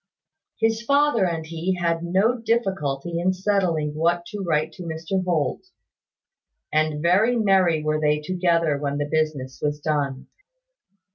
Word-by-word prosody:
His 225 0 +1
father 280 -5 +3
and 165 -2 -3
he 165 +3 -2
had 170 -2 0
no 190 +8 +2
difficulty 175 - -1
in 185 +2 +1
settling 185 -6 0
what 170 +3 0
to 210 - -5
write 160 -3 0
to 185 - -11
Mr 165 +3 -3
Holt; 175 - -1 1.1
and 155 0 +1
very 200 +8 +3
merry 190 -8 +3
were 155 0 0
they 150 0 +2
together 170 -2 +1
when 140 0 -2
the 145 - -1
business 150 -4 -2
was 150 0 -1
done. 145 -3 -2
170 Hz, 140 wpm, -23 LUFS, 155-190 Hz, 1.1 s, father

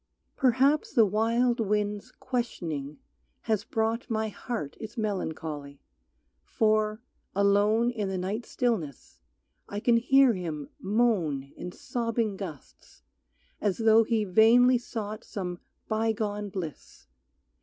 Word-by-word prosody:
Perhaps 270 +3 +2
the 225 - +6
wild 230 +4 +1
wind's 210 +2 -1
questioning 165 - -4 0.4
has 215 -2 0
brought 225 +3 -1
My 220 -1 -1
heart 215 - -5
its 225 +2 -8
melancholy, 160 -9 -4 0.6
for, 215 0 +1 0.3
alone 205 +4 +3
In 210 -5 -3
the 190 - -2
night 195 +6 -3
stillness, 185 - -2 0.5
I 205 - -3
can 235 +2 +3
hear 265 +1 +5
him 160 -6 -5
moan 185 - 0
In 180 - -6
sobbing 230 -1 -2
gusts, 175 -8 -10 0.6
as 200 -3 0
though 225 0 +5
he 225 -1 +1
vainly 235 +6 +5
sought 215 -3 -6
Some 180 -3 -5 0.3
bygone 215 -2 -1
bliss. 180 -6 -7
215 Hz, 110 wpm, -28 LUFS, 190-230 Hz, 0.6 s, the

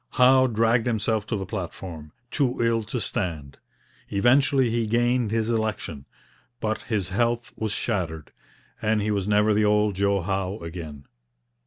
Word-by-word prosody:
Howe 130 +1 +5
dragged 115 +1 +2
himself 110 -2 0
to 110 - -1
the 95 -2 -3
platform, 85 -5 -6 0.2
too 135 -5 0
ill 115 -1 +2
to 120 +3 -3
stand. 80 -9 -4 0.5
Eventually 130 +3 +3
he 115 -1 0
gained 120 +1 +1
his 110 0 0
election, 110 -11 -2 0.5
but 110 0 -2
his 105 -6 -2
health 120 +4 -1
was 110 -1 -3
shattered, 85 -9 -2 0.5
and 110 -1 +1
he 105 - 0
was 100 -2 -1
never 105 +1 +3
the 105 +1 +2
old 105 0 +3
Joe 100 0 +1
Howe 95 +2 -2
again. 80 -6 -8
105 Hz, 150 wpm, -25 LUFS, 95-115 Hz, 0.5 s, Howe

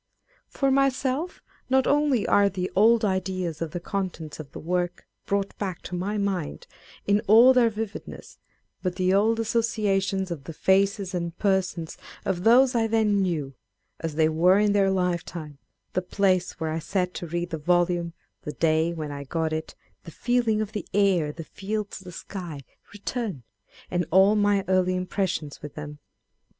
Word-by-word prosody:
For 275 -1 0
myself, 275 +4 0 0.3
not 265 0 +3
only 285 -6 +2
are 200 0 +4
the 185 -1 -4
old 220 +3 +5
ideas 185 -4 -2
of 165 - -2
the 175 - -5
contents 170 -5 -4
of 145 -2 -9
the - - -9
work 175 +1 -2 0.2
brought 200 0 -1
back 190 -4 -4
to 180 - -5
my 200 +4 -2
mind 195 -6 -2 0.4
in 205 +1 +3
all 230 +5 +8
their 245 -2 +4
vividness, 220 -1 -7 0.4
but 180 -1 -2
the 185 0 +2
old 220 +3 +3
associations 205 -4 0
of 145 -5 -6
the 165 - -7
faces 195 +2 +1
and 170 -1 -3
persons 190 -5 -1 0.3
of 180 -2 -1
those 250 +4 +6
I 230 -2 +2
then 215 -3 +2
knew, 155 -7 -1 0.5
as 160 -2 -4
they 155 0 +4
were 170 +4 +4
in 205 0 +3
their 200 -1 +3
lifetime 170 -5 -2 0.3
â€" - - -46
the 185 - +1
place 185 -1 0
where 160 -1 -2
I 160 - -2
sat 180 +2 -1
to 175 - -6
read 175 +1 -3
the 160 - -3
volume, 175 +1 +1 0.3
the 150 - -6
day 160 +1 +1
when 155 -3 -5
I 140 0 -6
got 160 +3 -2
it, 160 0 -4 0.3
the - - -9
feeling 235 +3 +1
of 215 -1 -3
the 210 -2 -5
air, 190 -7 +3
the 165 +2 -8
fields, 205 +6 -5
the 185 -2 -10
sky 175 -5 -7 0.3
â€" - - -24
return, 205 - -4 0.5
and 175 -2 0
all 190 +4 +5
my 205 -1 +2
early 185 -1 +2
impressions 180 -4 -2
with 145 -1 -9
them. 150 -1 -7
185 Hz, 175 wpm, -26 LUFS, 170-210 Hz, 0.5 s, all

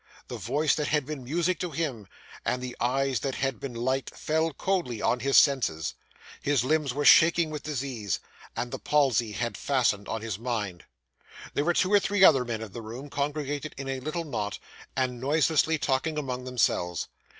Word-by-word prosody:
The - - -5
voice 145 +6 +1
that 150 -1 -1
had 150 -2 +1
been 150 -2 -6
music 170 +7 0
to 180 - -2
him, 140 -10 -3 0.4
and 125 - 0
the 125 -1 -6
eyes 130 0 +1
that 135 +4 -3
had 135 -4 -1
been 130 -3 -6
light, 130 +2 -1
fell 160 +1 0
coldly 150 - -1
on 125 - +1
his 135 +2 +3
senses. 125 - +3 0.5
His 140 -4 +2
limbs 150 0 +1
were 145 +3 -2
shaking 170 0 +6
with 150 -1 -4
disease, 130 - -3 0.4
and 120 - -3
the 135 - -4
palsy 130 -7 +2
had 120 +2 -2
fastened 120 -7 +1
on 110 - -3
his 110 -3 -4
mind. 105 -8 -3 0.7
There 145 - 0
were 175 0 +2
two 185 +3 +2
or 205 - +8
three 200 0 +1
other 135 -8 +7
men 115 -2 -4
in 110 - -8
the 115 - -7
room, 120 +6 -8
congregated 145 0 -3
in 135 0 -5
a 135 -1 -2
little 155 +5 -3
knot, 105 -8 -3 0.4
and 125 -2 -1
noiselessly 155 +3 +2
talking 150 +2 0
among 130 -3 -3
themselves. 90 -9 0
135 Hz, 185 wpm, -27 LUFS, 120-150 Hz, 0.7 s, or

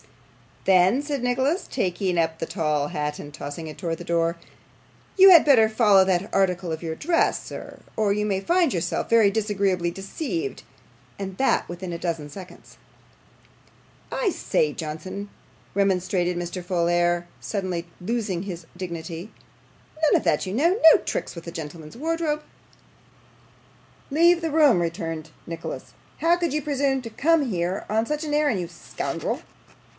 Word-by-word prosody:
'Then,' 190 +7 +5
said 290 -2 -3
Nicholas, 265 +8 0
taking 185 -4 -1
up 160 -1 +1
the - - -2
tall 150 -5 0
hat 150 0 -3
and 145 - -8
tossing 145 +3 -6
it 155 - -8
towards 165 -3 -2
the 175 - -8
door, 170 0 +1 0.8
'you 385 0 +9
had 345 -4 +9
better 235 -7 +6
follow 210 -4 +5
that 185 +1 0
article 180 -3 +1
of 160 +1 -4
your 160 -1 -2
dress, 330 - +1
sir, - - -9 0.2
or 210 -2 +2
you 210 +1 -1
may 195 -2 0
find 340 - +2
yourself 170 -3 -2
very 225 -3 +6
disagreeably 200 -4 0
deceived, 290 - -4 0.6
and 190 -1 -5
that 270 - +2
within 175 +1 -6
a - - -3
dozen 165 -4 -3
seconds.' 185 +5 -12 1.3
'I - - +1
say, 470 +6 0
Johnson,' 185 +6 -6 0.4
remonstrated 185 -2 +1
Mr. 175 +1 -4
Folair, 175 -1 +1
suddenly 185 -4 -3
losing 205 -2 -2
all 185 - -6
his 175 -4 -6
dignity, 170 +1 -6 0.7
'none 310 - +4
of - - +2
that, 150 - +1
you 185 - -4
know. 340 - +2
No - - +4
tricks - - -3
with 170 0 -9
a - - -4
gentleman's 160 +2 -8
wardrobe.' 315 0 -1 1.7
'Leave 340 +3 +5
the 325 -1 -2
room,' 290 - +5
returned 165 -2 -3 0.2
Nicholas. 165 0 -6 0.3
'How 340 +2 +3
could 340 -5 -1
you 305 - 0
presume 275 -2 0
to 230 - -6
come 300 +5 +2
here 180 0 -2
on 220 +1 +1
such 300 +4 -2
an 300 -1 -3
errand, 295 -9 +2
you 175 - -3
scoundrel? 170 0 -4
190 Hz, 155 wpm, -24 LUFS, 170-270 Hz, 1.7 s, you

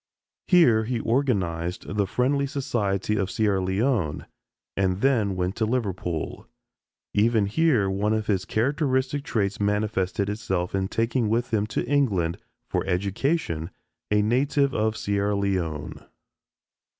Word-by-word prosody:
Here 120 -12 +5
he 120 0 -1
organized 95 -10 -1
the 100 -2 +1
Friendly 140 +6 +1
Society 105 -7 -1
of 100 -2 0
Sierra 100 -3 +1
Leone 95 - 0 0.5
and 95 0 0
then 115 -8 +2
went 90 +1 -1
to 110 - +1
Liverpool. 95 -9 -3 0.7
Even 110 0 +3
here 120 -1 +2
one 100 +2 0
of 110 -1 0
his 95 -3 0
characteristic 135 +3 0
traits 105 -6 -1
manifested 105 -1 0
itself 95 -4 -2
in 95 -1 0
taking 115 +2 0
with 115 +2 0
him 105 -1 +1
to - - -2
England 105 -12 +1 0.3
for - - -1
education 95 - -1 0.4
a 105 0 +3
native 135 +5 +2
of 110 0 0
Sierra 100 -1 0
Leone. 90 -7 -2
105 Hz, 125 wpm, -25 LUFS, 95-125 Hz, 0.7 s, Here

